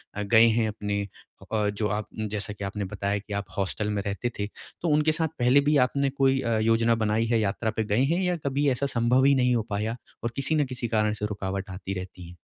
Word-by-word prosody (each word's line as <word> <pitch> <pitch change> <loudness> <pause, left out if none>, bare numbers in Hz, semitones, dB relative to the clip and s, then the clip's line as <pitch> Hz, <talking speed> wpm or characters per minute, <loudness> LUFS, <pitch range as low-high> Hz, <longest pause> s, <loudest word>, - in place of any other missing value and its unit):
अ, 105 - -2
गए 110 +2 +6
हैं 115 0 +2
अपने 105 -1 -2 0.4
हो - - -13
अ, 105 -1 +1
जो 105 +1 -1
आप 105 +1 -2 0.3
जैसा 105 0 -3
कि 100 - -8
आपने 100 +1 -3
बताया 100 +2 -2
कि 105 +1 -8
आप 100 0 -2
हॉस्टल 100 +2 -1
में 105 -1 -1
रहते 100 +4 -2
थे, 100 - -1 0.3
तो 175 - -1
उनके 150 +1 +3
साथ 160 +1 0
पहले 125 +3 +5
भी 150 - +4
आपने 140 +1 0
कोई 135 -1 +2
अ, 115 -3 0
योजना 115 +1 +3
बनाई 110 +2 +1
है, 115 0 +2
यात्रा 105 +2 -1
पे 110 - +2
गए 105 +4 +2
हैं 180 - 0
या 180 -1 +1
कभी 140 +1 +1
ऐसा 130 +2 0
संभव 120 +3 +3
ही 140 0 +5
नहीं 125 -1 +3
हो 115 - 0
पाया 105 +3 -2 0.3
और 115 - -1
किसी 140 +3 +1
न 150 -2 +2
किसी 125 -2 -4
कारण 105 -2 +1
से - - +1
रुकावट 100 -2 -4
आती 95 +1 -5
रहती 90 -2 -9
है? 90 - -13
110 Hz, 245 wpm, -26 LUFS, 105-130 Hz, 0.4 s, गए